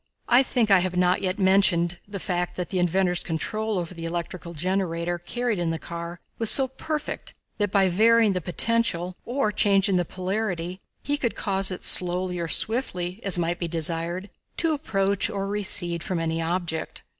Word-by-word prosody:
I 245 +2 +6
think 240 -5 0
I 195 - +7
have 180 0 -2
not 180 0 +2
yet 185 0 -1
mentioned 190 -3 +3
the 200 0 -6
fact 180 -2 -2
that 180 -2 -4
the 185 - 0
inventor's 180 0 +1
control 215 +6 -1
over 175 0 -4
the 165 -1 -7
electrical 170 0 -5
generator 175 0 -1
carried 235 +3 -2
in 170 -1 -1
the 165 - -1
car 170 +1 -7 0.2
was 225 -2 +5
so 270 -1 +6
perfect 300 +4 -5 0.2
that 205 -1 +1
by 195 -2 +4
varying 220 +3 +4
the 180 - -2
potential 180 -1 0
or 245 -3 0
changing 195 -2 +3
the 175 - +2
polarity 185 -1 -3 0.2
he 290 0 0
could 240 -5 -1
cause 195 -1 0
it 185 - -6
slowly 180 0 +3
or 170 - -2
swiftly, 185 -3 -1
as 195 -3 +5
might 175 0 -1
be 170 - -2
desired, 170 +3 -2 0.3
to 330 -2 +2
approach 200 -9 0
or 195 -2 -3
recede 190 -4 +1
from 185 - -2
any 165 0 -1
object. 165 -1 -3
185 Hz, 180 wpm, -25 LUFS, 175-205 Hz, 0.3 s, I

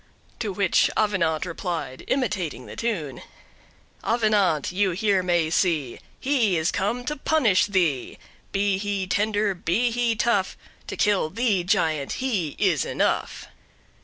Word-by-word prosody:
To 215 -3 -2
which 190 -1 +2
Avenant 185 -7 +1
replied, 170 -6 -5
imitating 190 - -1
the - - -10
tune: 175 - -3 0.8
"Avenant 210 - +2
you 195 +2 +1
here 195 +1 +2
may 175 -3 +1
see, 155 -9 0 0.2
He 245 -10 +2
is 160 +2 +1
come 220 +5 -2
to 300 - -2
punish 270 -11 +2
thee: 175 -10 0 0.3
Be 195 -1 +1
he 200 -1 -2
tender, 205 +1 +1
be 190 +7 0
he 235 -1 +1
tough, 210 -4 0 0.3
To - - -5
kill 205 -6 +2
thee, 215 -2 +1
giant, 155 -5 0
he 210 - -2
is 175 - +2
enough." - - -1
195 Hz, 135 wpm, -24 LUFS, 170-220 Hz, 0.8 s, which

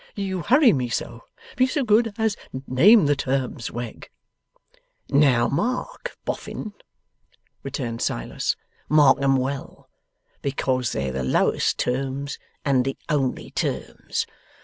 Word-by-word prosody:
You 190 -3 -2
hurry 260 - +5
me 125 -4 -1
so. 115 0 -4 0.3
Be 255 +1 +4
so 275 +2 0
good 225 0 +3
as 220 -2 +1 0.3
name 185 - +6
the 145 0 +3
terms, 130 -3 -2
Wegg.' 120 -1 -7 1.0
'Now, 135 -4 +4
mark, 250 - -2
Boffin,' 215 - -5 0.9
returned 120 -4 -4
Silas: - - -1 0.3
'Mark 145 -3 +5
'em 135 0 +4
well, 135 +1 -4 0.5
because 130 -3 0
they're 65 -1 -2
the 65 +1 -3
lowest 65 - +2
terms 135 +2 -2 0.3
and 135 -3 +3
the 135 +1 -3
only 140 -4 -1
terms. - - -2
140 Hz, 120 wpm, -24 LUFS, 130-195 Hz, 1.0 s, name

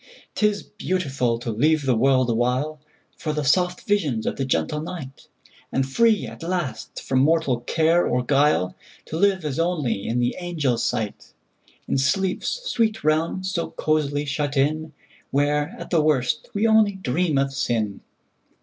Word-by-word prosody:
'T 210 - +3
is 205 -1 -2
beautiful 135 -10 -1
to 115 0 -4
leave 150 +6 +2
the 130 -2 +3
world 130 +2 +3
awhileFor 145 +6 -3
the 150 - -1
soft 180 +5 +2
visions 150 - +1
of - - -1
the 135 - -2
gentle 130 - -1
night; 155 -5 -8 0.4
And 135 0 0
free, 220 +8 +3
at - - -10
last, 170 -5 -3
from 130 - +1
mortal 145 -3 +2
care 160 +7 +2
or 125 0 0
guile, 140 -9 +2 0.3
To - - -6
live 190 -2 +2
as 145 0 -2
only 150 - -1
in 115 - -1
the 120 0 +1
angels' 150 -9 -1
sight, 105 -2 -3 0.5
In - - +1
sleep's 190 - 0
sweet 225 - 0
realm 160 +4 +1
so 185 -2 -2
cosily 150 -2 0
shut 145 0 -2
in, 155 +3 0 0.4
Where, 145 +1 0
at - - -9
the 165 -3 +4
worst, 150 -1 +1
we 205 +2 +2
only 220 -2 +4
dream 170 -3 0
of 135 0 +1
sin! 110 -6 -1
150 Hz, 160 wpm, -23 LUFS, 130-175 Hz, 0.5 s, the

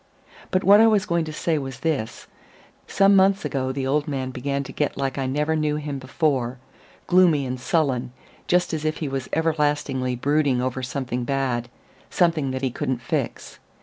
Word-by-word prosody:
But 185 - 0
what 200 +2 +7
I 225 - +7
was 210 -2 +3
going 170 -4 0
to 155 - -6
say 155 0 -1
was 135 -2 -7
this: 145 -9 -2 0.6
some 195 +1 +4
months 195 -1 +4
ago 130 -3 -1
the 135 0 -3
old 145 +2 0
man 130 -3 -3
began 140 +2 -2
to 135 - -9
get 150 +1 -2
like 135 0 -2
I 135 - -1
never 150 +4 0
knew 150 -1 0
him 145 -2 -4
before 130 -2 -1 0.5
gloomy 175 -6 +4
and 125 0 -4
sullen, 130 -3 0 0.4
just 175 -1 +2
as 155 -1 -2
if 155 0 -1
he 155 - -3
was 135 -2 -4
everlastingly 145 -5 0
brooding 140 0 +1
over 130 +1 -2
something 125 -1 -3
bad, 125 -2 -1 0.4
something 165 -6 +1
that 130 +1 -4
he 130 - 0
couldn't 125 0 -3
fix. - - -3
140 Hz, 180 wpm, -23 LUFS, 130-160 Hz, 0.6 s, what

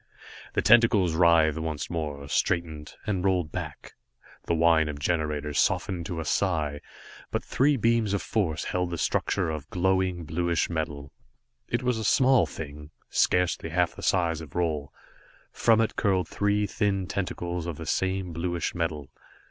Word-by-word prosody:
The - - 0
tentacles 115 -7 +5
writhed 80 -2 +4
once 80 -2 -3
more, 75 -4 -4
straightened, 80 -1 -1
and 95 -4 -1
rolled 90 -5 +1
back. - - -7 0.5
The 85 - +2
whine 80 -1 +4
of 75 - -5
generators 75 -1 -1
softened 85 -3 0
to 85 -3 -4
a 80 - -4
sigh, 85 -7 +1
and 70 - -9 0.5
but - - -2
three 140 +2 +2
beams 115 -3 +2
of 100 - -2
force 85 -8 -1
held 90 -1 -1
the 85 - -4
structure 85 +1 0
of 75 -2 -6
glowing, 95 -1 0
bluish 85 +2 0
metal. 75 -4 -4 0.6
It - - -1
was 125 -2 0
a - - -3
small 130 +4 +4
thing, 75 -1 -8 0.2
scarcely 90 -2 +1
half 90 +1 +1
the - - -9
size 85 -3 +1
of 75 -4 -11
Roal. 80 -5 -1 0.6
From 115 -1 +3
it 115 - 0
curled 95 -5 +1
three 105 +2 +1
thin 100 -3 0
tentacles 90 -2 -3
of 85 -4 -4
the 80 - -7
same 95 +2 -1
bluish 85 +1 -2
metal. 80 -5 -3
85 Hz, 160 wpm, -27 LUFS, 80-95 Hz, 0.6 s, tentacles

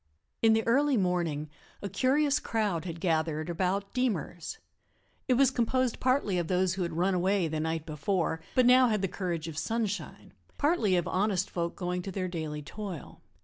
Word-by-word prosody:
In 225 -1 +5
the 225 0 +1
early 275 +3 +3
morning 170 -6 0 0.4
a - - -1
curious 275 - +2
crowd 205 -7 -1
had 170 -2 -5
gathered 160 -1 0
about 190 +3 -1
"Deemer's." 195 - -2 0.7
It 255 - +4
was 270 0 +4
composed 255 0 0
partly 255 -8 +1
of 170 - -2
those 185 0 +2
who 190 - -4
had 170 -2 -2
run 180 +4 +1
away 185 0 +2
the 155 0 -2
night 160 0 -2
before, 160 +2 -1
but 255 - +5
now 255 +1 +7
had 215 -4 0
the - - +2
courage 175 -4 -3
of 160 -1 -4
sunshine, 220 -1 -3 0.2
partly 285 - +2
of 175 -2 0
honest 190 -1 0
folk 170 -1 -2
going 180 -1 -2
to 195 - -6
their 185 0 -2
daily 155 -4 -4
toil. 190 -1 -7
185 Hz, 180 wpm, -29 LUFS, 170-225 Hz, 0.7 s, now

